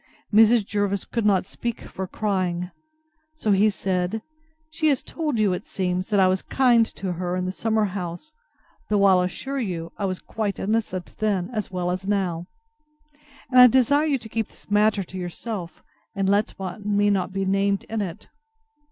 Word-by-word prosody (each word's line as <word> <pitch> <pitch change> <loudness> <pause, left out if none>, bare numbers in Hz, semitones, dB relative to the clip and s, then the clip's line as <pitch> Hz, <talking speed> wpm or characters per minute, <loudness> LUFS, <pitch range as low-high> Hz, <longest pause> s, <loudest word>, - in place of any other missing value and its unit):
Mrs. 220 0 +6
Jervis 200 -1 -1
could 230 -3 -1
not 195 -3 +3
speak 235 +4 -4
for 190 0 -6
crying. 185 -3 -1 0.6
So 220 -9 0
he 200 +2 +5
said, 190 +2 -2 0.5
She 310 0 0
has 280 -4 +2
told 300 -8 -2
you, 205 -3 +3
it 180 - -5
seems, 185 0 -2
that 205 -2 +2
I 190 - +6
was 185 0 +1
kind 240 -4 +3
to 190 -2 -3
her 180 +1 -2
in 185 0 -1
the 185 - -1
summer 220 +2 +1
house, 180 - -5 0.6
though 205 -1 +3
I'll 190 -2 +6
assure 265 +10 -3
you, 170 -8 -3
I 200 - 0
was 185 -1 -1
quite 210 0 -3
innocent 200 -4 -2
then 205 -2 0
as 215 -3 -2
well 180 -1 -2
as 185 +2 -4
now; 180 -4 -1 1.0
and 255 - +6
I 250 - +11
desire 265 +5 +3
you 285 -3 +2
to 230 -3 -10
keep 220 0 -2
this - - -16
matter 210 -1 +3
to 185 +1 -8
yourself, 180 0 -6 0.3
and 195 -1 0
let 205 +2 +1 0.3
me 205 0 +2
not 190 -2 0
be 195 0 -2
named 195 +1 +1
in 220 -1 -3
it. 180 -4 -6
200 Hz, 180 wpm, -24 LUFS, 185-220 Hz, 1.0 s, I